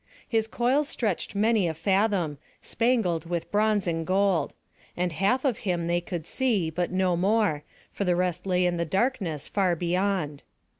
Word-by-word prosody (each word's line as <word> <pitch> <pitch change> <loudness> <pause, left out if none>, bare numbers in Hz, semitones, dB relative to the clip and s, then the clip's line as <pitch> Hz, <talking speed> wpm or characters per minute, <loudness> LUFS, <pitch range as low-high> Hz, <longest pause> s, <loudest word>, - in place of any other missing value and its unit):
His 225 -1 +1
coils 260 +6 +1
stretched 210 -4 -2
many 215 -2 +2
a 160 - -2
fathom, 190 -4 +1 0.2
spangled 220 -9 0
with 170 -2 -3
bronze 210 -1 +2
and 165 -2 -1
gold; 185 -3 +1 0.4
and 180 0 0
half 200 - +1
of 250 -5 +1
him 175 -3 -1
they 175 +1 +1
could 170 -2 -5
see, 210 -11 0
but 175 +2 -1
no 185 -1 +1
more; 195 -4 +1 0.3
for - - -3
the 180 -2 +2
rest 180 +1 -1
lay 180 -1 +2
in 175 -1 +1
the 170 - 0
darkness 190 - -1
far 190 -4 +1
beyond. 175 -3 -1
185 Hz, 165 wpm, -26 LUFS, 170-210 Hz, 0.4 s, many